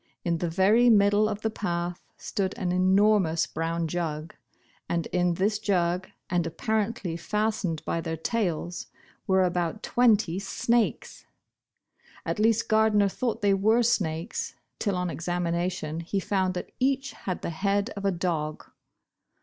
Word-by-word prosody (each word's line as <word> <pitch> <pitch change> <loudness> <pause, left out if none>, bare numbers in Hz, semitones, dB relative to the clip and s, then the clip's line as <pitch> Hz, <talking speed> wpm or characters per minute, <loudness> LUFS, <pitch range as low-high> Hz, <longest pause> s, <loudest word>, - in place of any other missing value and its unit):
In 170 -1 0
the 175 - -1
ver} 205 +8 +4
middle 205 0 +4
of 210 0 -4
the 220 - -1
path 175 -4 -3 0.2
stood 195 0 -3
an 185 -6 -1
enormous 185 -2 +3
brown 165 +1 -2
jug. 160 -2 -3 0.6
and 170 -2 0
in 180 -1 +2
this 205 +4 +1
jug, 180 -3 0 0.2
and 175 -1 +1
appar 215 +6 0
ently 175 -8 -5
fastened 210 -5 -1
by 165 - -1
their 165 -1 -4
tails, 175 -3 -2 0.4
were 190 0 +4
about 175 +2 -1
twent}* 235 -4 +4 0.2
snakes! 230 +3 -1 1.0
At - - -2
least 225 +1 +3
Gardner 215 -2 +4
thought 230 +2 -2
they 200 -1 +4
were 220 +5 +3
snakes, 180 -6 -1 0.2
till 205 -3 0
on 180 -1 -1
examination 170 -1 -2
he 175 +4 -2
found 190 -2 0
that 180 - -5
each 270 +1 +1
had 185 -2 -5
the - - -2
head 200 +6 0
oi 200 0 -2
a - - +3
dog. 165 -4 -2
190 Hz, 145 wpm, -27 LUFS, 170-215 Hz, 1.0 s, ver